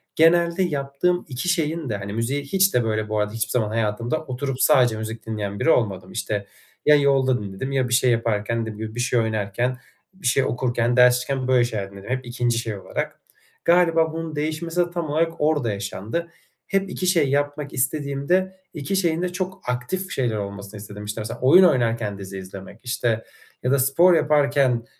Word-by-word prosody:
Genelde 170 +2 +4
yaptığım 150 +3 -1
2 135 +7 -3
şeyin 165 -4 0
de, 105 - -1
hani, 100 +1 -6
müziğe 125 +6 -1
hiç 190 +7 +2
de, 125 - +3
böyle, 110 -1 -1
bu 110 -1 0
arada 105 0 0
hiçbir 115 -1 -2
zaman 110 -4 +1
hayatımda 115 +7 -1
oturup 130 +1 -3
sadece 125 -7 +4
müzik 110 0 -6
dinleyen 105 -2 -4
biri - - +2
olmadım. 95 - +1
İşte, 100 -1 -3 0.4
ya 150 - +7
yolda 135 -4 +3
dinledim, 100 +7 -5
ya 130 -2 +1
bir - - -1
şey 125 0 +4
yaparken; 115 0 0
dediğim 110 -2 -5
gibi, 110 +1 -6
bir - - -4
şey 125 0 +2
oynarken, 110 +3 -1 0.4
bir 185 -9 -5
şey 130 +2 +3
okurken, 120 -1 0
ders 125 0 +7
çalışırken... 130 +1 -2
böyle 125 -2 +4
şeyler 100 -5 -4
dinledim, 100 +3 -11
hep 130 0 -2
2. 120 -1 0
şey 110 -3 -3
olarak. 95 - -4 0.5
Galiba 165 -2 +4
bunun 165 -2 -5
değişmesi 160 +3 -2
de 175 0 -1
tam 170 -3 -3
olarak 165 +2 +1
orada 150 -7 +2
yaşandı. 100 - -4 0.4
Hep 195 -1 0
2 185 - -3
şey 165 -7 +3
yapmak 145 +1 -1
istediğimde, 145 +7 0 0.2
2 155 +7 -3
şeyin 170 -3 +1
de 180 - 0
çok 185 0 -4
aktif 180 +10 -3
şeyler 120 -5 0
olmasını 100 +1 -6
istedim. 105 0 -9
İşte, 105 +1 -4
mesela 110 +2 -6
oyun 180 +9 +7
oynarken 115 - +2
dizi 95 0 -7
izlemek, 95 +3 -10
işte, 120 -3 -1 0.4
ya 125 - +1
da 140 - +3
spor 170 +8 +5
yaparken, 140 -6 +2
125 Hz, 185 wpm, -23 LUFS, 110-155 Hz, 0.5 s, ya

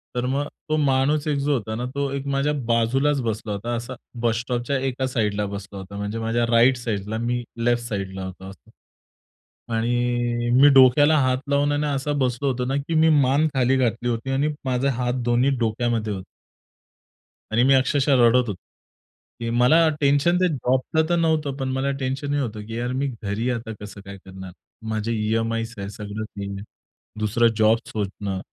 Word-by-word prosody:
तर 125 - -1
मग 140 +2 -1 0.2
तो 155 - +2
माणूस 145 +2 +1
एक 145 -2 +1
जो 145 0 +2
होता 110 -3 -2
ना, 120 +2 -3
तो 140 +2 -2
एक 140 0 -4
माझ्या 140 +2 +1
बाजूलाच 130 +5 +2
बसला 110 -2 -3
होता, 115 +4 -4
असा 120 +2 -5 0.3
बस 115 -1 +1
स्टॉपच्या 120 +2 -2
एका 130 +1 -2
साइडला 105 -4 -1
बसला 100 0 -7
होता. 95 +1 -10
म्हणजे 105 +2 -3
माझ्या 115 +1 0
राइट 120 +2 +5
साइडला 110 -2 -3
मी 120 +1 -1 0.2
लेफ्ट 120 0 +2
साइडला 95 -4 -4
होतो 95 +1 -9
असं. 95 - -16 1.0
आणि 120 0 0
मी 145 - +9
डोक्याला 145 +4 +6
हात 130 0 +2
लावून 145 +1 +2
आणि 145 +1 0
असा 140 +1 -1
बसलो 125 +2 -1
होतो 125 0 -3
ना, 135 - -1
की 145 +4 -3
मी 160 +1 +5
मान 140 +4 +3
खाली 130 +1 +3
घातली 120 -1 0
होती 120 +3 -2
आणि 140 +3 +1 0.2
माझे 130 +1 0
हात 125 0 -1
दोन्ही 120 +3 +2
डोक्यामध्ये 115 -1 -1
होते. 95 -1 -6 1.3
आणि 120 +3 +3
मी 135 +1 +5
अक्षरशः 135 +1 +3
रडत 125 +1 +4
होतो. 105 - -2 0.9
की 115 0 -3
मला 130 +8 +4
टेन्शन 145 +5 +3
ते 185 - +3
जॉबचं 130 +3 0
तर 175 - +3
नव्हतं 155 -4 +1
पण 135 -1 -2
मला 135 +1 0
टेन्शन 135 +2 -2
हे 145 - +1
होतं 110 -5 -4
की 115 0 -5
यार 120 +1 -2
मी 140 +1 0 0.2
घरी 105 +5 -1
आता 115 -2 -4
कसं 105 -1 -9
काय 100 0 -9
करणार? 95 -1 -10 0.4
माझे 110 +1 -2
ई-एम-आयज 115 +1 -1
आहे, 100 0 -5
सगळं 105 +1 -6
ते 100 -2 -7
आहे. 100 +1 -6 0.6
दुसरं 110 +2 +2
जॉब 110 +1 +4
शोधणं, 100 -2 -4
120 Hz, 180 wpm, -23 LUFS, 110-135 Hz, 1.3 s, मी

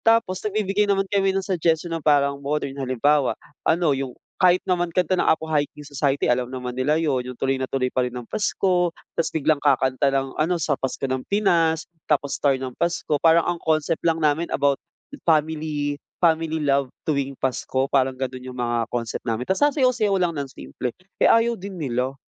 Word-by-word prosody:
Tapos 225 -5 +2
nagbibigay 210 -1 0
naman 195 -1 +2
kami 195 -1 +3
ng 195 - -1
suggestion, 170 -2 0
na 165 - -2
parang 140 -2 +2
modern. 140 -1 -2
Halimbawa, 135 +2 +2 0.3
ano, 165 -2 +3
yung 135 -2 -3 0.2
kahit 180 -1 +6
naman 175 -1 0
kanta 180 +1 +1
ng 180 - +1
Apo 160 0 +2
Hiking 150 -1 -2
Society, 140 -1 0
alam 125 0 +1
naman 125 -1 -5
nila 135 +4 +1
'yon, 140 -6 0
yung 125 -1 -8
Tuloy 135 0 0
Na 130 - -2
Tuloy 130 -1 -1
Pa 130 - +1
Rin 125 0 -3
ang 120 - -6
Pasko, 180 - +1 0.2
tapos 160 -1 0
biglang 155 -1 +1
kakanta 130 -1 +2
ng 135 -1 -1
ano, 160 +4 +1
Sa 150 -3 0
Pasko 135 0 -4
ng 130 0 -2
Pinas, 165 -6 +2 0.2
tapos 140 -1 +1
Star 140 -2 +3
ng 130 -1 -5
Pasko, 170 -2 -1
parang 165 0 +5
ang 175 -1 -1
concept 155 +1 0
lang 165 -1 +2
namin 155 +2 +1
about 140 -1 +1 0.5
family, 150 -2 0 0.2
family 160 -2 +2
love 140 -1 +2 0.2
tuwing 140 -3 -1
Pasko, 130 0 -1
parang 130 -1 +2
ganun 130 -1 -4
yung 130 -1 -8
mga 120 -1 -1
concept 115 -2 -3
namin. 115 +2 -1
Ta's 190 - 0
sasayaw-sayaw 255 -8 +3
lang 175 -2 0
ng 140 -2 -4
simple. 125 -1 -5 0.3
Eh, - - +6
ayaw 230 +1 +4
din 195 -1 -8
nila. 130 -2 -2
150 Hz, 190 wpm, -23 LUFS, 135-170 Hz, 0.5 s, kahit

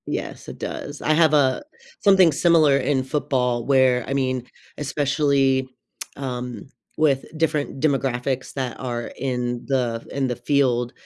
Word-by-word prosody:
Yes, - - -5
it - - -8
does. 145 0 -6
I 155 - +2
have, 160 -1 +4
uh, 135 -3 +3 0.4
something 190 -4 +5
similar 155 -1 +4
in 135 -1 0
football 130 -4 -1
where, 130 -3 +3
I 135 - -2
mean, 130 -2 -1 0.3
especially, 140 -2 +1 0.5
um, 125 -3 -5 0.3
with 140 -4 +2
different 155 -3 -1
demographics 135 -3 -1
that 130 -3 -4
are 120 -2 -4
in 125 -2 -2
the 120 -4 -1
in 135 -1 -1
the 125 - -2
field 125 -2 +1
135 Hz, 135 wpm, -22 LUFS, 125-145 Hz, 0.5 s, something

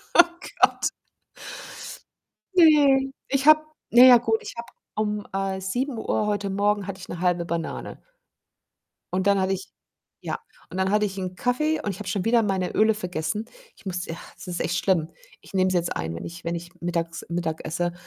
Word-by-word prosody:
Oh 350 - +10 0.4
Gott. - - +4 1.7
Ne. 285 -5 +6 0.2
Ich 275 +1 0
habe 310 0 +9 0.3
na 240 +2 +8
ja, 250 -2 +10
gut, 225 -1 +1
ich - - -8
habe 235 - -6 0.3
um, 210 -1 -1
äh, 195 0 -2
7:00 225 +1 -1
heute 205 -1 -1
Morgen 205 0 +1
hatte 195 -1 -5
ich 180 - -10
'ne 175 - -6
0,5 175 -1 +1
Banane. 170 -1 -4 1.1
Und 190 +1 0
dann 200 -1 +4
hatte 190 +1 +1
ich 190 0 -4 0.5
ja, - - -3 0.3
und 185 - -6
dann 190 +1 +1
hatte 210 0 +3
ich 195 -1 -3
'n 185 -1 -4
Kaffee 305 - +1
und 205 - -2
ich 190 - -6
habe 205 -3 -6
schon 190 +1 -1
wieder 230 0 +4
meine 190 -3 -1
Öle 220 0 +4
vergessen. 180 +1 -3 0.3
Ich - - -20
musste 180 -2 -3
ja, - - -5 0.2
es - - -10
ist 175 -1 -4
echt 175 +1 0
schlimm. 170 -5 +1 0.3
Ich - - -16
nehme 185 -1 +2
sie 185 - +1
jetzt 170 -1 0
ein, 80 +1 -3
wenn 85 - -6
ich 170 +1 -8
wenn 170 +1 -1
ich 170 0 -6
mittags 170 -1 -3
Mittag 170 -2 -2
esse, 175 +2 -1
195 Hz, 195 wpm, -25 LUFS, 175-220 Hz, 1.7 s, Oh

